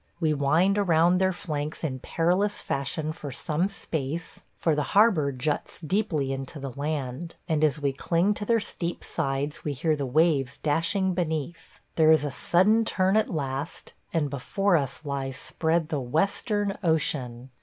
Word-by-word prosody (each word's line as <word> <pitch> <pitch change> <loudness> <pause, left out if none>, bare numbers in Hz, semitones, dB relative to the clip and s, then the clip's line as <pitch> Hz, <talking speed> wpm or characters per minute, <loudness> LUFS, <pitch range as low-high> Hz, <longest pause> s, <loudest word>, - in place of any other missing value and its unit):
We 160 -3 +2
wind 165 +8 +3
around 175 -1 +4
their 190 0 +3
flanks 155 -4 -4
in 130 -5 -2
perilous 180 +9 +1
fashion 150 +3 -2
for 145 -3 -7
some 155 +7 -1
space, 165 -4 -5
for 165 - +1
the 150 - +1 0.2
harbor 190 -10 +5
juts 140 +3 -3
deeply 155 -5 0
into 135 +3 -6
the 135 -1 -5
land, 145 +2 -4
and 155 -1 +1
as 150 -2 +2
we 140 -2 0
cling 170 +8 +1
to 205 - -5
their 230 +1 +3
steep 175 -4 -4
sides 140 +2 -2
we 150 - -2
hear 155 +4 +1
the 140 -2 -3
waves 140 -1 +2
dashing 170 +5 +1
beneath. 165 -2 -4 0.2
There 160 -1 +6
is 155 -2 +4
a 145 - -2
sudden 195 +10 +3
turn 190 -2 +1
at 220 0 +3
last, 140 -1 -4 0.2
and 150 -4 0
before 180 +8 +1
us 145 0 -1
lies 135 -2 -3
spread 160 +4 0
the 150 -4 -1
Western 195 - 0
Ocean! 135 -6 -1
155 Hz, 165 wpm, -26 LUFS, 140-175 Hz, 0.2 s, There